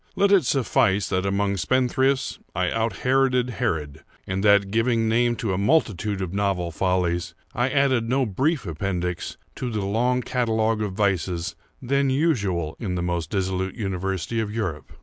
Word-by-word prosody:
Let 200 Hz, 0 st, +3 dB
it 190 Hz, -8 st, +5 dB
suffice, 120 Hz, -, +2 dB
that 95 Hz, +1 st, 0 dB
among 100 Hz, 0 st, 0 dB
spendthrifts 130 Hz, +5 st, +1 dB, 0.2 s
I 90 Hz, -1 st, 0 dB
out 115 Hz, -3 st, -2 dB
Heroded 125 Hz, -1 st, +2 dB
Herod, 75 Hz, -7 st, -2 dB, 0.2 s
and 95 Hz, +1 st, -2 dB
that, 100 Hz, -1 st, +4 dB
giving 115 Hz, 0 st, +2 dB
name 120 Hz, +1 st, +2 dB
to 110 Hz, -4 st, -2 dB
a 90 Hz, -, -1 dB
multitude 105 Hz, -, +1 dB
of 90 Hz, -1 st, -5 dB
novel 100 Hz, -4 st, 0 dB
follies, 90 Hz, 0 st, 0 dB, 0.2 s
I 120 Hz, +2 st, +1 dB
added 130 Hz, -5 st, +2 dB
no 135 Hz, +1 st, +2 dB
brief 135 Hz, -, 0 dB
appendix 90 Hz, +1 st, -3 dB, 0.2 s
to 125 Hz, -, -3 dB
the 105 Hz, -4 st, -2 dB
long 125 Hz, +5 st, +1 dB
catalogue 110 Hz, -3 st, 0 dB
of 105 Hz, -3 st, -2 dB
vices 90 Hz, -3 st, 0 dB, 0.3 s
then 140 Hz, +2 st, +1 dB
usual 100 Hz, -, 0 dB
in 95 Hz, -5 st, -3 dB
the 90 Hz, -, -2 dB
most 85 Hz, -3 st, -2 dB
dissolute 95 Hz, -1 st, -1 dB
university 95 Hz, 0 st, -2 dB
of 110 Hz, -2 st, -2 dB
Europe. 100 Hz, -9 st, -4 dB
105 Hz, 160 wpm, -24 LUFS, 95-125 Hz, 0.3 s, it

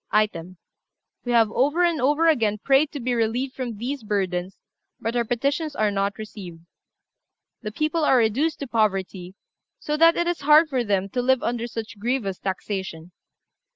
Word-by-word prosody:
"Item. 185 Hz, -4 st, -1 dB, 0.7 s
We 245 Hz, -, -2 dB
have 225 Hz, -2 st, +4 dB
over 290 Hz, +9 st, +2 dB
and 335 Hz, -5 st, 0 dB
over 295 Hz, +5 st, +2 dB
again 225 Hz, -10 st, +2 dB
prayed 275 Hz, +6 st, +2 dB
to 290 Hz, -, -6 dB
be 250 Hz, 0 st, -1 dB
relieved 240 Hz, +3 st, -1 dB
from 245 Hz, -5 st, -5 dB
these 260 Hz, +5 st, -4 dB
burthens, 190 Hz, -3 st, -2 dB, 0.4 s
but 225 Hz, +2 st, -3 dB
our 240 Hz, -, +2 dB
petitions 280 Hz, +6 st, -2 dB
are 215 Hz, -4 st, +1 dB
not 200 Hz, 0 st, -1 dB
received. 185 Hz, -6 st, -9 dB, 1.0 s
The 215 Hz, -, -5 dB
people 310 Hz, +7 st, -1 dB
are 265 Hz, -3 st, +4 dB
reduced 245 Hz, +8 st, +1 dB
to 280 Hz, -, -4 dB
poverty, 195 Hz, -5 st, -1 dB, 0.4 s
so 300 Hz, -11 st, -3 dB
that 330 Hz, +1 st, +5 dB
it 345 Hz, -, +1 dB
is 345 Hz, -2 st, -2 dB
hard 305 Hz, +2 st, +5 dB
for 260 Hz, -4 st, 0 dB
them 195 Hz, -3 st, 0 dB
to 245 Hz, +5 st, -2 dB
live 260 Hz, 0 st, +2 dB
under 235 Hz, 0 st, -2 dB
such 225 Hz, -2 st, -7 dB
grievous 220 Hz, -4 st, -2 dB
taxation. 190 Hz, -3 st, -5 dB
235 Hz, 170 wpm, -24 LUFS, 205-280 Hz, 1.0 s, that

